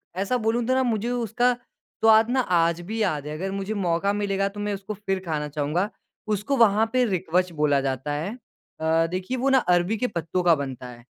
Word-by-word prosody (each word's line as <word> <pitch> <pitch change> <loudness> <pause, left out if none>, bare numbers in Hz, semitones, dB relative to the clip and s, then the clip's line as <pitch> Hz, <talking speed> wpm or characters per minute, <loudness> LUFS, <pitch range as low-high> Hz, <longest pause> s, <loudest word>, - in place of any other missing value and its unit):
ऐसा 200 +7 0
बोलूँ 230 +1 0
तो 255 - +1
ना 260 - +3
मुझे 235 -1 -1
उसका 245 +1 +1
स्वाद 225 -2 +1
ना 260 +1 +1
आज 170 -4 +2
भी 220 +5 -4
याद 155 -8 0
है। 150 - -4
अगर 190 +3 -3
मुझे 195 +2 -3
मौका 195 0 0
मिलेगा 195 -1 0
तो 205 +1 -10
मैं 205 0 -2
उसको 200 +2 -5
फ़िर 195 -2 -2
खाना 150 -3 -2
चाहूँगा। 150 +7 -1 0.5
उसको 225 +8 -2
वहाँ 220 -2 +5
पे 255 -1 +3
रिक्वच 180 -2 0
बोला 150 -3 +2
जाता 135 +2 -2
है। 160 +8 -3 0.5
अ, 160 +1 +2
देखिए 185 +9 -3
वो 270 +3 +1
ना 270 - +5
अरबी 180 -1 +2
के 250 - 0
पत्तों 175 -2 -2
का 170 -2 +5
बनता 130 -3 -6
है। 120 -1 -12
195 Hz, 210 wpm, -25 LUFS, 165-220 Hz, 0.5 s, वहाँ